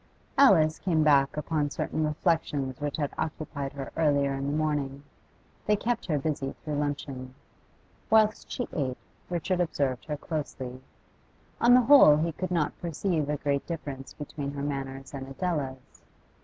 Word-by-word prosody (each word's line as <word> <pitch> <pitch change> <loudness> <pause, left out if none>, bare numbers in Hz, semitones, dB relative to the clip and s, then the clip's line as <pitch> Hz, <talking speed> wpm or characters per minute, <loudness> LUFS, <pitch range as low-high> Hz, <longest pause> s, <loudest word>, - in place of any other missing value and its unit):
Alice 175 - +5
came 165 -5 +2
back 140 -2 +4
upon 150 -1 0
certain 150 +2 -2
reflections 145 -4 -1
which 145 0 -2
had 145 -3 -2
occupied 150 -3 -3
her 140 -1 -6
earlier 145 -3 +2
in 135 0 -3
the 145 +2 0
morning; 145 -3 -1 0.6
they 210 - +4
kept 230 +1 -2
her 155 -4 +1
busy 140 -2 -2
through 150 - -3
luncheon. 140 -3 -4 0.7
Whilst 215 -1 +3
she 245 - -2
ate, 130 -4 -1 0.3
Richard 180 +1 -1
observed 140 -7 0
her 150 -2 -3
closely; 135 -5 -5 0.8
on 245 +1 +7
the 250 - +7
whole 245 - +8
he 165 +2 0
could 185 +4 -4
not 165 -4 -1
perceive 165 -2 -1
a 150 - 0
great 140 -1 -1
difference 140 -5 -6
between 145 -1 -5
her 140 0 -4
manners 135 -1 -4
and 135 -1 -6
Adela's. 135 -4 -4
150 Hz, 155 wpm, -28 LUFS, 140-165 Hz, 0.8 s, whole